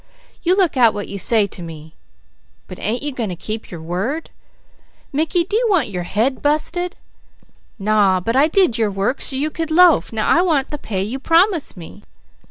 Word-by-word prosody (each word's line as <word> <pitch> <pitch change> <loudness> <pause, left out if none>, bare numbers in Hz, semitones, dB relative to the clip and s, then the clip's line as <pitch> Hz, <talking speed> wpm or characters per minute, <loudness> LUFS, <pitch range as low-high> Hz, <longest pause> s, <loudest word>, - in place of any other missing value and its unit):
_" - - -32 0.4
"You 365 +2 +2
look 360 -8 +2
out 235 -3 +5
what 205 - -5
you 200 - -5
say 220 +1 +3
to 190 - -7
me." 160 -2 -10 0.7
"But 185 - -10
ain't 230 +6 -2
you 295 - -2
going 235 -6 -3
to 180 - -4
keep 215 +5 -5
your 165 -3 -9
word?" 200 - -3 0.8
"Mickey, 320 +4 +1
do 405 - -4
you 475 +2 +2
want 330 - +2
your 180 -2 -3
head 245 +6 0
busted?" 340 +5 -1 0.8
"_Naw! 195 -3 +2
But 230 - 0
I 280 +3 +5
did 325 - +2
your 220 -2 +2
work 200 +7 -2
so 270 - -2
you 295 +4 -1
could 325 0 -4
loaf; 345 0 +5
now 220 -1 -2
I 340 - +4
want 310 -7 0
the 295 - -5
pay 195 -6 -3
you 235 +7 -4
promised 330 - +2
me. 170 - -11
255 Hz, 200 wpm, -19 LUFS, 200-325 Hz, 0.8 s, out